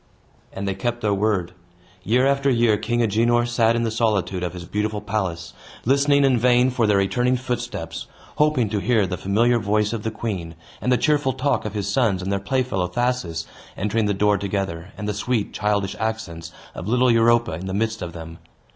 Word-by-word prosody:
And 100 0 -5
they 95 - 0
kept 120 +2 -3
their 105 -3 +1
word. 100 -4 0 0.5
Year 120 +6 +2
after 140 0 +2
year, 120 -4 +3
King 120 +3 0
Agenor 120 +2 +2
sat 115 -1 +2
in 115 - 0
the 115 - -1
solitude 105 -5 0
of 90 -1 -3
his 90 -1 -8
beautiful 105 +3 -2
palace, 95 -6 -3 0.3
listening 140 +2 +4
in 130 -3 +3
vain 125 +1 +4
for 120 -3 +1
their 105 -1 +3
returning 125 +6 +1
footsteps, 120 -10 -4 0.3
hoping 150 -6 +3
to 105 -1 -1
hear 110 +1 +2
the 90 - -3
familiar 115 +6 +2
voice 105 +1 0
of 115 - -3
the 110 - -2
queen, 100 -7 -5 0.3
and 125 - 0
the 125 - +4
cheerful 145 -2 +1
talk 130 -1 0
of 105 0 -5
his 100 -2 -2
sons 105 -8 +1
and 95 - -2
their 100 - 0
playfellow 100 -3 -1
Thasus, 120 -9 -1 0.3
entering 105 +2 0
the 100 - 0
door 105 0 +2
together, 95 -3 -3
and 105 0 -5
the 105 - -1
sweet, 105 +1 -1
childish 100 -1 0
accents 100 -7 -4 0.2
of - - -7
little 125 +2 +3
Europa 115 0 +3
in 85 +4 -5
the 95 - -3
midst 110 +1 -1
of 85 -2 -5
them. 80 0 -9
110 Hz, 200 wpm, -22 LUFS, 95-120 Hz, 0.5 s, listening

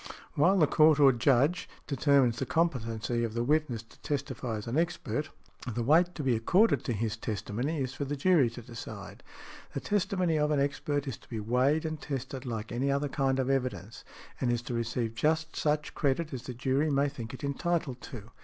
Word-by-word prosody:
While 180 +7 +4
the 160 - +6
Court, 155 +1 +5
or 140 -2 +8
Judge, 135 +7 +2 0.2
determines 140 -3 +3
the 135 - -1
competency 120 -8 0
of 115 -1 -3
the 120 - 0
witness 135 -4 0
to 115 - -21
testify 130 -5 -3
as 105 - -5
an 115 - -3
expert, 155 -2 -1 0.5
the 120 - -1
weight 170 +7 +4
to 150 - -4
be 130 -3 +2
accorded 180 - +3
to 125 - 0
his 110 0 -2
testimony 115 +7 -3
is 130 -1 -2
for 145 - -4
the 145 +2 -3
jury 145 -4 +4
to 115 +1 -10
decide. 115 0 -9 0.5
The - - 0
testimony 185 -5 0
of 150 0 +2
an 150 -2 +2
expert 145 0 -1
is 135 - -4
to - - -22
be 115 - -4
weighed 130 +8 +2
and 155 -2 -4
tested 135 -1 -5
like 110 -2 -4
any 130 +4 0
other 140 +1 0
kind 135 -1 +1
of 130 -1 0
evidence, 115 -6 -2 0.4
and 125 - +1
is 120 -1 -1
to 120 - -5
receive 115 -1 -2
just 160 +6 0
such 150 0 0
credit 150 +2 0
as 130 - -4
the 125 - -7
jury 135 +5 +1
may 140 0 +2
think 125 -4 -6
it - - -13
entitled 140 -2 -1
to. 115 -3 -9
135 Hz, 200 wpm, -30 LUFS, 120-150 Hz, 0.5 s, or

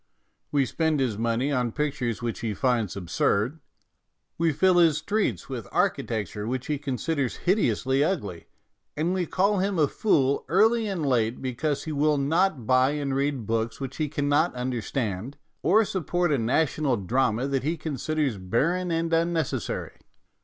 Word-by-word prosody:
We 140 -2 +2
spend 160 +1 0
his 125 -5 0
money 115 +5 0
on 125 -4 0
pictures 140 -6 -2
which 115 -1 -3
he 110 -3 -3
finds 115 -7 0
absurd; 100 - 0 0.8
we 165 0 +2
fill 175 +5 +3
his 165 -4 +5
streets 155 - -1
with - - -6
architecture 105 -2 -1
which 130 +1 -3
he 150 -2 -2
considers 140 -1 -2
hideously 135 - +2
ugly; 105 - -3 0.5
and 165 +4 0
we 180 -3 -1
call 200 +2 +2
him 195 0 0
a 150 -3 +4
fool 140 -7 +1
early 220 +5 +3
and 185 -6 -2
late 120 -3 +1
because 135 +3 -2
he 160 - -5
will 150 0 +2
not 155 - +1
buy 130 +3 +3
and 140 -2 -2
read 140 -4 -1
books 115 +1 -1
which 135 -1 -6
he 155 -2 -1
cannot 145 +2 +1
understand, 125 -2 -3 0.2
or 210 +7 +4
sup 185 -6 -4
port 175 -2 +1
a 140 - +2
national 135 +2 +1
drama 115 +4 0
that 135 -1 0
he 160 +5 -1
considers 150 -5 -2
barren 165 - 0
and 165 0 -1
unnecessary. 165 -2 -1
140 Hz, 160 wpm, -26 LUFS, 120-165 Hz, 0.8 s, his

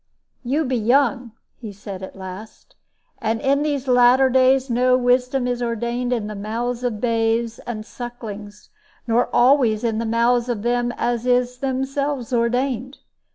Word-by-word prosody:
"You 285 +6 0
be 255 -1 0
young," 245 0 +1 0.3
he 220 -4 -7
said 195 -1 -9
at 190 - -8
last; 190 +3 -10 0.4
"and 225 +1 -1
in 275 +3 +1
these 285 -3 -2
latter 250 +1 +5
days 260 +1 +4
no 250 +1 +3
wisdom 250 +1 +1
is 245 0 -2
ordained 235 +1 -2
in 235 -4 -1
the 210 - -5
mouths 230 +4 -3
of 235 -4 -2
babes 230 0 0
and 215 -3 -5
sucklings, 215 -4 -9 0.3
nor 235 0 +2
always 245 -4 +3
in 225 -2 0
the 230 - -2
mouths 235 +2 +2
of 220 -4 -2
them 240 0 0
as 240 0 -1
is 250 0 +1
themselves 270 0 -2
ordained. 250 +2 -1
245 Hz, 155 wpm, -21 LUFS, 225-255 Hz, 0.4 s, latter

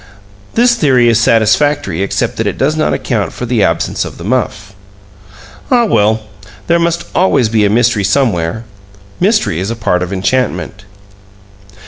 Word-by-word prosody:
This 240 +1 +4
theory 130 - +2
is 115 -1 +3
satisfactory 115 - +1
except 100 - -2
that - - -1
it - - -3
does 150 +4 +1
not 155 - 0
account 110 -6 -2
for 125 - -5
the 120 -2 0
absence 85 -4 0
of - - -8
the 85 - -9
muff. 105 -3 -2 1.0
Ah, 245 -2 +3
well, 110 - +1 0.4
there 170 0 +2
must 170 0 -1
always 135 -11 +2
be 110 -2 +2
a - - +2
mystery 115 -1 +2
somewhere! 105 -3 0 0.6
Mystery 205 - +1
is 95 +3 -3
a 115 - -3
part 90 -5 -1
of 90 +1 -4
enchantment. 100 +1 -2
115 Hz, 155 wpm, -13 LUFS, 100-145 Hz, 1.0 s, This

